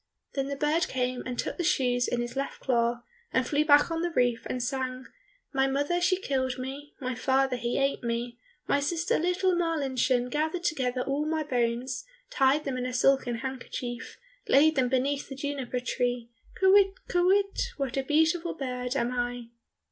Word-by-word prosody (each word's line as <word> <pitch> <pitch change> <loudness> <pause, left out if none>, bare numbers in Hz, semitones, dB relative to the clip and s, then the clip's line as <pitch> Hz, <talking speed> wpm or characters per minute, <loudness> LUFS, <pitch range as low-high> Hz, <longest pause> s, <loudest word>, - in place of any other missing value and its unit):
Then 275 -1 -1
the 280 - -3
bird 300 +4 +1
came 250 -1 -1
and 250 -1 -4
took - - -3
the 350 - -1
shoes 250 -7 +2
in 240 - -1
his 240 +1 -5
left 275 0 -3
claw, 240 -1 +1 0.3
and 255 - +2
flew 295 +1 +2
back 295 +1 +5
on 330 0 -1
the 345 - 0
roof, 245 -7 +1
and 250 -1 -2
sang, 255 0 -3 0.5
"My 270 0 +3
mother 285 +6 0
she 365 +1 +2
killed 260 -6 -1
me, 275 +3 -7
My 255 -2 -2
father 265 +1 +1
he 240 0 -2
ate 275 0 +1
me, 235 +1 -3 0.3
My 285 - +3
sister, 330 +4 0
little 360 +2 +1
Marlinchen, 270 -7 +1
Gathered 315 +4 -1
together 255 -7 0
all 280 +3 -1
my 315 0 0
bones, 250 -1 -1 0.3
Tied 280 - +3
them 265 -2 -3
in 250 - -2
a 255 - -5
silken 255 -1 +3
handkerchief, 250 -1 -5 0.3
Laid 310 +3 +5
them 255 -2 +2
beneath 275 +2 0
the 270 - -6
juniper 275 -3 -3
tree, 245 -1 -2 0.3
Kywitt, 390 0 +5
kywitt, 385 +3 +2 0.2
what 275 -3 -2
a 270 - +1
beautiful 320 +5 +1
bird 250 -2 -3
am 245 -2 0
I!" 245 -1 -3
270 Hz, 180 wpm, -28 LUFS, 250-305 Hz, 0.5 s, back